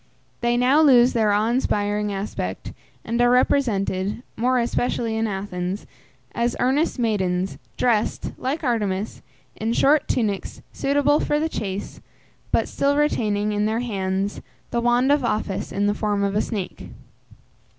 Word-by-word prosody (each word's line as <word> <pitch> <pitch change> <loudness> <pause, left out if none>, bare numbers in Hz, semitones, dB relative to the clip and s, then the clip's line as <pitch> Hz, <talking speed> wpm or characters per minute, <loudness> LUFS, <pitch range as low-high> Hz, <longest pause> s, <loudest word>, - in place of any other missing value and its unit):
They 240 0 +1
now 260 +5 +4
lose 255 -4 +6
their 220 -3 +2
awe 210 +3 +2
inspiring 210 -4 0
aspect, 195 - -4 0.3
and 235 +2 0
are 245 - +5
represented, 215 -5 +1
more 250 +3 +1
especially 235 -1 0
in 225 0 0
Athens, 190 -1 -4 0.5
as 235 0 0
earnest 280 +6 +1
maidens, 190 -6 -1 0.2
dressed, 225 -4 0
like 280 +5 -2
Artemis, 210 -5 -1 0.3
in 225 +1 -1
short 285 +4 +3
tunics 205 -5 -2
suitable 285 +1 +2
for 295 - 0
the 315 - 0
chase, 200 -9 -5 0.5
but - - +2
still 280 +1 +1
retaining, 215 -8 +1
in 210 0 +1
their 220 +2 0
hands, 195 -3 -2 0.3
the 235 - 0
wand 240 +3 +3
of 290 -2 +3
office 210 -4 -2
in 200 +1 0
the 205 - +2
form 205 -1 -1
of 200 0 0
a 210 - +3
snake. 200 -5 -5
225 Hz, 145 wpm, -23 LUFS, 205-250 Hz, 0.5 s, lose